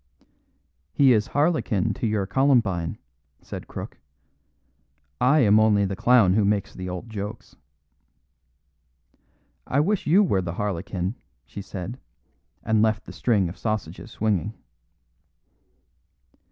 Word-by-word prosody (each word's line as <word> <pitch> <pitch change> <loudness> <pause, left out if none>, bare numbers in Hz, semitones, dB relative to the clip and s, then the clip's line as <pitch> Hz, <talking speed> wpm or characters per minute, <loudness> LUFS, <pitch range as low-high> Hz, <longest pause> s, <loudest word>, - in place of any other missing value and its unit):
"He 135 -3 +5
is 105 -1 +1
harlequin 140 - 0
to 115 - -3
your 105 -2 0
columbine," 100 -7 +1 0.5
said - - -8
Crook. - - -8 1.2
"I 140 +5 +4
am 105 -2 +5
only 105 -2 +3
the 100 0 -3
clown 115 -3 +4
who 105 +1 +3
makes 100 -1 0
the 90 0 -6
old 90 +5 -6
jokes." 105 0 -7 2.1
"I 140 - +1
wish 195 +6 0
you 185 +7 +5
were 100 - +1
the 85 -2 -4
harlequin," 95 +1 -3 0.3
she 100 - -8
said, 100 +4 -7 0.6
and 110 -1 +2
left 110 -1 +1
the - - -10
string 105 -7 +1
of 85 - -9
sausages 110 -3 -4
swinging. 105 -1 -1
105 Hz, 120 wpm, -24 LUFS, 95-120 Hz, 2.1 s, He